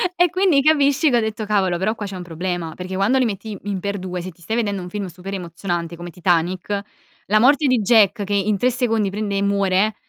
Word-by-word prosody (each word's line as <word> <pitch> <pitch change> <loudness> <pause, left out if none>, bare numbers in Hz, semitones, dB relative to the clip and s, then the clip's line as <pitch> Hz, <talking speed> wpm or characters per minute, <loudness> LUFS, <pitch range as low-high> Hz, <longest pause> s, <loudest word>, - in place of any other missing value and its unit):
e 355 0 +4
quindi 365 -5 +3
capisci 290 0 +3
che 245 - +3
ho - - +4
detto: 220 -1 -3
"Cavolo 195 -4 +1
però 200 +5 0
qua 210 - -5
c'è 195 -1 -6
un 180 - -6
problema." 175 -1 -4
Perché 185 +1 -6
quando 200 +8 +2
li 260 - +3
metti 210 -1 -4
in 200 -2 -3
x2 185 -3 -4
se 185 +1 -7
ti 170 - -25
stai 220 +7 -3
vedendo 205 -5 -1
un 180 - -7
film 205 0 -4
super 185 +2 -8
emozionante 175 -2 -4
come 175 +1 -8
Titanic, 180 +3 0 0.4
la 215 +2 +3
morte 285 +3 +4
di 250 -4 +3
Jack 205 -1 +4
che 200 +1 -3
in 200 +1 +1
3 250 +6 +2
secondi 225 -5 0
prende 205 0 -3
e 195 - 0
muore 200 +1 +1
200 Hz, 230 wpm, -21 LUFS, 185-225 Hz, 0.4 s, e